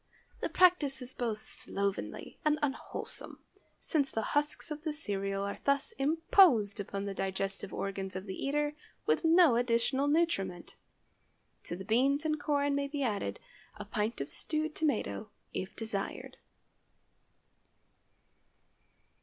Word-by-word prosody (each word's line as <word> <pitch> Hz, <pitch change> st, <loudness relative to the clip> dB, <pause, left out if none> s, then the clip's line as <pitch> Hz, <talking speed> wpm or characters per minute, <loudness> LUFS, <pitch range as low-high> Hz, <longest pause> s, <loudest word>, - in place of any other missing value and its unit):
The -, -, -1 dB
practice 340 Hz, -7 st, +4 dB
is 250 Hz, +1 st, -8 dB
both 225 Hz, -3 st, -2 dB
slovenly 200 Hz, 0 st, -3 dB
and 305 Hz, 0 st, +3 dB
unwholesome, 270 Hz, -2 st, -4 dB, 0.4 s
since 285 Hz, -4 st, +1 dB
the 220 Hz, -, -2 dB
husks 295 Hz, +2 st, 0 dB
of 300 Hz, 0 st, -4 dB
the 310 Hz, -2 st, -2 dB
cereal 195 Hz, -8 st, -2 dB
are 200 Hz, 0 st, -3 dB
thus 280 Hz, 0 st, +2 dB
imposed 290 Hz, -, +4 dB
upon 200 Hz, 0 st, -3 dB
the 200 Hz, -, -3 dB
digestive 195 Hz, +1 st, -3 dB
organs 195 Hz, -1 st, -3 dB
of 190 Hz, +1 st, -4 dB
the 190 Hz, -, -4 dB
eater, 295 Hz, +6 st, 0 dB, 0.3 s
with -, -, +2 dB
no 325 Hz, -6 st, +6 dB
additional 245 Hz, +3 st, +2 dB
nutriment. 240 Hz, -, 0 dB, 0.9 s
To -, -, -4 dB
the 190 Hz, +2 st, -7 dB
beans 275 Hz, +8 st, +3 dB
and 310 Hz, -1 st, +1 dB
corn 285 Hz, -1 st, +1 dB
may 280 Hz, 0 st, 0 dB
be 280 Hz, 0 st, -2 dB
added 200 Hz, -, -1 dB, 0.4 s
a 210 Hz, -1 st, -7 dB
pint 215 Hz, +2 st, -1 dB
of 140 Hz, -, -4 dB
stewed 310 Hz, 0 st, 0 dB
tomato, 265 Hz, -8 st, -1 dB, 0.2 s
if 190 Hz, +3 st, -4 dB
desired. 220 Hz, -3 st, -4 dB
250 Hz, 130 wpm, -32 LUFS, 200-295 Hz, 0.9 s, no